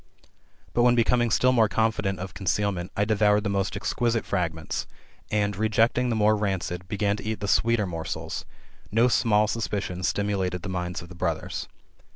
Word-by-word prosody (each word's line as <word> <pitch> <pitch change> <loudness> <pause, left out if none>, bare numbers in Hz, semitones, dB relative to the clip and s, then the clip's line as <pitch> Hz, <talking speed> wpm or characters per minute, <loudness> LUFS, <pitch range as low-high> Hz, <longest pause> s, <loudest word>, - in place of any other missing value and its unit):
But 120 - +2
when, 120 0 +5
becoming 120 0 +3
still 125 +4 +3
more 115 -4 +4
confident 110 -4 0
of 95 +1 -6
concealment, 95 -2 -1
I 100 - +2
devoured 105 -1 +3
the 100 - -1
most 100 0 -1
exquisite 115 +3 0
fragments, 80 -4 -2 0.4
and, 105 -1 0
rejecting 110 +4 +2
the 115 - 0
more 110 0 +4
rancid, 95 -3 -2
began 105 0 0
to - - -8
eat 110 -1 -3
the 100 - -3
sweeter 115 +1 +2
morsels; 85 -3 -4 0.5
no 115 +3 +4
small 110 -3 +3
suspicion 100 -5 -3
stimulated 95 -2 -1
the 100 - -4
minds 90 0 -3
of 85 - -13
the - - -10
brothers. - - -3
105 Hz, 170 wpm, -26 LUFS, 95-110 Hz, 0.5 s, when